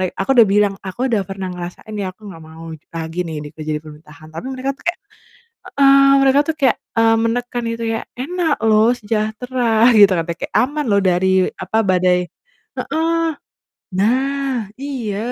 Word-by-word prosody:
mere -, -, +1 dB
aku 195 Hz, -, -2 dB
udah 230 Hz, -2 st, +7 dB
bilang, 205 Hz, 0 st, +2 dB
"Aku 205 Hz, +7 st, -3 dB
udah 220 Hz, -4 st, +2 dB
pernah 195 Hz, -1 st, -5 dB
ngerasain 180 Hz, +4 st, -8 dB
ya, 190 Hz, -2 st, -3 dB
aku 210 Hz, 0 st, -13 dB
gak 165 Hz, -3 st, -11 dB
mau 160 Hz, +1 st, -11 dB, 0.3 s
lagi 165 Hz, +1 st, -4 dB
nih 150 Hz, -2 st, -6 dB
kerja 155 Hz, -1 st, -5 dB
di -, -, -5 dB
pemerintahan," 155 Hz, 0 st, -14 dB
tapi 165 Hz, +10 st, -7 dB
mereka 265 Hz, +1 st, -3 dB
tuh -, -, -20 dB
kayak 345 Hz, -, -1 dB, 0.8 s
heeh, 275 Hz, 0 st, +6 dB
mereka 270 Hz, +1 st, +4 dB
tuh 320 Hz, -, 0 dB
kayak, 270 Hz, -5 st, +2 dB, 0.2 s
eee, 225 Hz, 0 st, +4 dB
menekan 240 Hz, +1 st, -2 dB
itu 230 Hz, 0 st, -4 dB
ya, 225 Hz, -, -2 dB, 0.2 s
"Enak 320 Hz, +4 st, -1 dB
loh, 220 Hz, +1 st, +4 dB
sejahtera," 225 Hz, +2 st, +1 dB
gitu 205 Hz, -2 st, +8 dB
katanya, 165 Hz, 0 st, -3 dB
kayak, -, -, -6 dB
aman 295 Hz, +4 st, +1 dB
loh 200 Hz, -1 st, +3 dB
dari, 185 Hz, 0 st, +3 dB
apa, 220 Hz, -, -2 dB
badai 180 Hz, -1 st, +2 dB, 0.6 s
heeh. 330 Hz, +1 st, 0 dB, 0.7 s
Nah, 260 Hz, 0 st, 0 dB
iya, 250 Hz, -8 st, -4 dB
220 Hz, 170 wpm, -18 LUFS, 185-260 Hz, 0.8 s, gitu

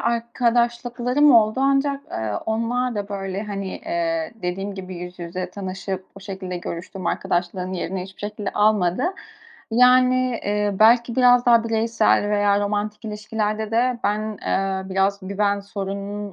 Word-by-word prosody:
arkadaşlıklarım 240 Hz, +3 st, +2 dB
oldu 220 Hz, +3 st, +4 dB
ancak, 275 Hz, 0 st, +1 dB
aaa, 110 Hz, -2 st, -2 dB
onlar 235 Hz, +2 st, 0 dB
da, 205 Hz, 0 st, -3 dB
böyle, 195 Hz, 0 st, -4 dB
hani, 200 Hz, -2 st, -5 dB
ııı, 165 Hz, +4 st, -2 dB
dediğim 195 Hz, +3 st, -3 dB
gibi 185 Hz, -1 st, -7 dB
yüz 180 Hz, +1 st, -8 dB
yüze 180 Hz, +1 st, -5 dB
tanışıp 190 Hz, 0 st, -5 dB
o -, -, -10 dB
şekilde 190 Hz, -2 st, -6 dB
görüştüm, 175 Hz, +2 st, -6 dB
arkadaşlığın 180 Hz, +1 st, -1 dB
yerini 185 Hz, +1 st, -3 dB
hiçbir 190 Hz, 0 st, -12 dB
şekilde 210 Hz, -1 st, -4 dB
almadı. 205 Hz, 0 st, +2 dB, 0.7 s
Yani, 250 Hz, 0 st, +4 dB
ııı, 205 Hz, -1 st, 0 dB
belki 235 Hz, +2 st, +5 dB
biraz 245 Hz, -1 st, +5 dB
daha 235 Hz, -1 st, +5 dB
bireysel 225 Hz, -2 st, +2 dB
veya 205 Hz, -1 st, +3 dB
romantik 210 Hz, +2 st, -2 dB
ilişkilerde 215 Hz, 0 st, -3 dB
de 240 Hz, +1 st, +1 dB
ben, 210 Hz, +1 st, +2 dB, 0.3 s
ııı, 190 Hz, 0 st, -1 dB
biraz 195 Hz, +1 st, +1 dB
güven 200 Hz, 0 st, +1 dB
sorununun 200 Hz, +1 st, -5 dB
205 Hz, 135 wpm, -22 LUFS, 190-235 Hz, 0.7 s, belki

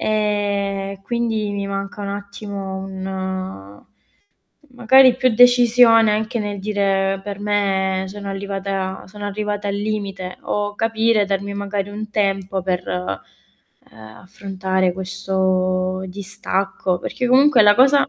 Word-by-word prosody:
E, 200 Hz, -2 st, -1 dB
quindi 225 Hz, -2 st, -1 dB
mi 200 Hz, 0 st, -3 dB
manca 195 Hz, +1 st, -5 dB
un 200 Hz, -, -4 dB
attimo 200 Hz, -1 st, -6 dB
un 190 Hz, -, -6 dB, 0.9 s
magari 255 Hz, +1 st, +6 dB
più 255 Hz, 0 st, +2 dB
decisione 240 Hz, -2 st, +6 dB
anche 220 Hz, +3 st, -1 dB
nel 205 Hz, -2 st, -4 dB
dire 195 Hz, -1 st, 0 dB
per 205 Hz, -1 st, -6 dB
me, 195 Hz, -2 st, 0 dB
sono 200 Hz, +1 st, -7 dB
arrivata 195 Hz, -1 st, -3 dB
sono 205 Hz, +1 st, -9 dB
arrivata 205 Hz, 0 st, -3 dB
al 200 Hz, -, -1 dB
limite, 200 Hz, -3 st, -4 dB
o 205 Hz, 0 st, -2 dB
capire 225 Hz, -1 st, +2 dB
darmi 200 Hz, 0 st, -2 dB
magari 200 Hz, 0 st, -3 dB
un 215 Hz, +1 st, -6 dB
tempo 195 Hz, -2 st, -1 dB
per, 180 Hz, -1 st, -2 dB
ehm, 180 Hz, -, -3 dB, 0.7 s
affrontare 190 Hz, -, -3 dB
questo 185 Hz, 0 st, -1 dB
distacco, 190 Hz, -1 st, -2 dB
perché 250 Hz, -, -3 dB
comunque 260 Hz, -1 st, +6 dB
la 205 Hz, 0 st, +7 dB
cosa 275 Hz, +4 st, +5 dB
200 Hz, 120 wpm, -20 LUFS, 190-210 Hz, 0.9 s, la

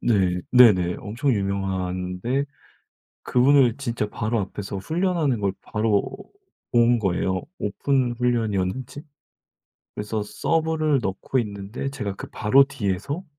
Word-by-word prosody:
네 95 Hz, -6 st, +2 dB
네네. 100 Hz, -9 st, +6 dB
엄청 115 Hz, +7 st, -1 dB
유명한데 95 Hz, +4 st, -2 dB, 0.8 s
그분을 130 Hz, -1 st, +4 dB
진짜 120 Hz, -6 st, -2 dB
바로 110 Hz, +2 st, -1 dB
앞에서 100 Hz, 0 st, -5 dB
훈련하는 160 Hz, -, 0 dB
걸 100 Hz, -2 st, 0 dB
바로 105 Hz, -1 st, 0 dB, 0.6 s
본 120 Hz, 0 st, +4 dB
거예요. 95 Hz, -1 st, 0 dB, 0.2 s
오픈 125 Hz, +4 st, 0 dB
훈련이었는지. 120 Hz, +1 st, -1 dB, 0.9 s
그래서 105 Hz, +1 st, -3 dB
서브를 155 Hz, +5 st, 0 dB
넣고 95 Hz, +6 st, -2 dB
있는데 105 Hz, +4 st, -5 dB
제가 105 Hz, -8 st, -4 dB
그 -, -, -8 dB
바로 135 Hz, +6 st, +4 dB
뒤에서 140 Hz, -, -3 dB
110 Hz, 255 characters per minute, -24 LUFS, 100-135 Hz, 0.9 s, 네네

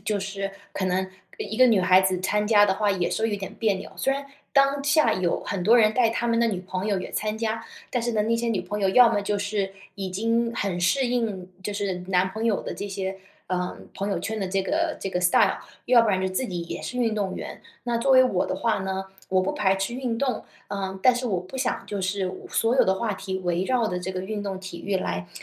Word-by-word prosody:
就 210 Hz, -1 st, 0 dB
是 195 Hz, 0 st, -4 dB, 0.2 s
可 190 Hz, -, -1 dB
能 185 Hz, +1 st, 0 dB, 0.3 s
一 220 Hz, -, -5 dB
个 255 Hz, -, +8 dB
女 220 Hz, -5 st, +4 dB
孩 185 Hz, +1 st, +6 dB
子 190 Hz, -1 st, +1 dB
参 210 Hz, +2 st, 0 dB
加 205 Hz, -2 st, +6 dB
的 195 Hz, -, +2 dB
话 205 Hz, 0 st, +1 dB
也 180 Hz, -3 st, 0 dB
是 225 Hz, +1 st, 0 dB
有 205 Hz, -, -1 dB
点 195 Hz, -1 st, -6 dB
别 215 Hz, -3 st, +2 dB
扭。 190 Hz, -, -7 dB
虽 270 Hz, -, +1 dB
然 280 Hz, +1 st, -3 dB, 0.3 s
当 275 Hz, 0 st, +3 dB
下 290 Hz, +2 st, +4 dB
有 180 Hz, -2 st, 0 dB
很 195 Hz, -3 st, -3 dB
多 230 Hz, +4 st, +6 dB
人 215 Hz, -1 st, +5 dB
带 245 Hz, -3 st, +4 dB
她 235 Hz, +1 st, -1 dB
们 230 Hz, 0 st, +2 dB
的 235 Hz, -, +4 dB
女 190 Hz, -4 st, -2 dB
朋 185 Hz, +1 st, -4 dB
友 200 Hz, -3 st, +1 dB
也 -, -, -6 dB
参 215 Hz, 0 st, -1 dB
加， 225 Hz, 0 st, -2 dB, 0.3 s
但 245 Hz, -, 0 dB
是 240 Hz, -, 0 dB
呢， 215 Hz, -, +2 dB
那 230 Hz, +1 st, +1 dB
些 235 Hz, 0 st, -1 dB
女 205 Hz, -5 st, 0 dB
朋 205 Hz, +3 st, -4 dB
友 195 Hz, -, +2 dB
要 245 Hz, +3 st, +7 dB
么 205 Hz, -, +1 dB
就 205 Hz, 0 st, -1 dB
是 200 Hz, -1 st, -2 dB, 0.2 s
已 195 Hz, -2 st, -4 dB
经 230 Hz, +4 st, 0 dB
很 190 Hz, -3 st, -1 dB
适 260 Hz, +8 st, +2 dB
应， 220 Hz, -7 st, -1 dB
就 205 Hz, -, -3 dB
是 200 Hz, -2 st, -1 dB
男 185 Hz, 0 st, +3 dB
朋 220 Hz, +3 st, -4 dB
友 220 Hz, -4 st, +2 dB
的 -, -, -5 dB
这 200 Hz, -, -5 dB
些， 190 Hz, 0 st, -3 dB, 0.3 s
呃， 180 Hz, -1 st, -2 dB, 0.2 s
朋 200 Hz, +1 st, -2 dB
友 185 Hz, -, 0 dB
圈 220 Hz, +4 st, -3 dB
的 190 Hz, -, -2 dB
这 195 Hz, +1 st, +1 dB
个 310 Hz, -, 0 dB
这 -, -, -3 dB
个 180 Hz, -1 st, -1 dB
style， 180 Hz, -, +4 dB, 0.3 s
要 245 Hz, -2 st, +6 dB
不 225 Hz, -, +1 dB
然 190 Hz, -2 st, +2 dB
就 190 Hz, -, 0 dB
自 190 Hz, +7 st, -1 dB
己 175 Hz, -2 st, -3 dB
也 170 Hz, -, -6 dB
是 250 Hz, -, -4 dB
运 230 Hz, -3 st, +1 dB
动 200 Hz, -3 st, -1 dB
员。 -, -, -7 dB, 0.2 s
那 240 Hz, -1 st, 0 dB
作 270 Hz, +4 st, +1 dB
为 260 Hz, -1 st, +8 dB
我 190 Hz, -8 st, +1 dB
的 -, -, -2 dB
话 230 Hz, -1 st, +1 dB
呢， 190 Hz, 0 st, -3 dB, 0.2 s
我 185 Hz, 0 st, +3 dB
不 185 Hz, -, -1 dB
排 195 Hz, -2 st, +2 dB
斥 195 Hz, +5 st, -2 dB
运 245 Hz, -3 st, -2 dB
动， 260 Hz, -5 st, -1 dB, 0.2 s
呃， 190 Hz, -1 st, -4 dB
但 255 Hz, +4 st, +5 dB
是 245 Hz, +1 st, -2 dB
我 190 Hz, -4 st, 0 dB
不 185 Hz, +9 st, -9 dB
想 260 Hz, -, -1 dB
就 205 Hz, -1 st, -3 dB
是 190 Hz, 0 st, -1 dB
我 185 Hz, -, -9 dB
所 230 Hz, +2 st, +1 dB
有 -, -, +5 dB
的 190 Hz, 0 st, +2 dB
话 215 Hz, 0 st, -1 dB
题 190 Hz, 0 st, -4 dB
围 175 Hz, -1 st, 0 dB
绕 240 Hz, +2 st, +1 dB
着 180 Hz, -3 st, -2 dB
这 185 Hz, +1 st, -4 dB
个 185 Hz, 0 st, -3 dB
运 205 Hz, +2 st, -4 dB
动 195 Hz, -2 st, -4 dB
体 190 Hz, -3 st, -8 dB
育 200 Hz, -1 st, +1 dB
来， 90 Hz, -, -3 dB
200 Hz, 295 characters per minute, -25 LUFS, 190-230 Hz, 0.3 s, 个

